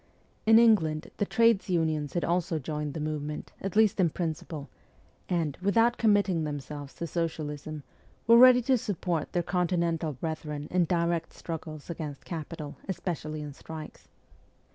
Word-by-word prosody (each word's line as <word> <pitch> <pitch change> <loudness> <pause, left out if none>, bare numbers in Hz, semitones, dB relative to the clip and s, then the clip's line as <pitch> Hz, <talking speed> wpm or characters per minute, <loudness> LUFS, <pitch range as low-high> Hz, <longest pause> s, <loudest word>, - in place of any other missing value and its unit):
In 225 0 +8
England 170 -10 +4
the 205 - 0
trades 230 -4 +3
unions 160 -4 0
had 175 - 0
also 175 0 0
joined 150 0 -4
the - - -3
movement, 150 0 -4
at 195 0 -4
least 215 -2 +4
in 175 -3 +4
principle, 155 -3 -4 0.6
and, 165 -6 0
without 230 +5 +3
com 220 -3 +5
mitting 190 -5 +2
themselves 145 -1 -6
to 170 - -4
Socialism, 155 -2 -4 0.4
were 230 - +7
ready 250 -1 +8
to 255 0 +3
support 175 -6 -2
their 175 - 0
Continental 170 -3 0
brethren 150 +1 -4
in 180 -1 +3
direct 170 -1 0
struggles 155 -2 -7
against 155 -5 -6
capital, 155 -2 -6
especially 155 -4 -3
in 145 -1 -7
strikes. 155 +2 -10
165 Hz, 145 wpm, -29 LUFS, 150-185 Hz, 0.6 s, In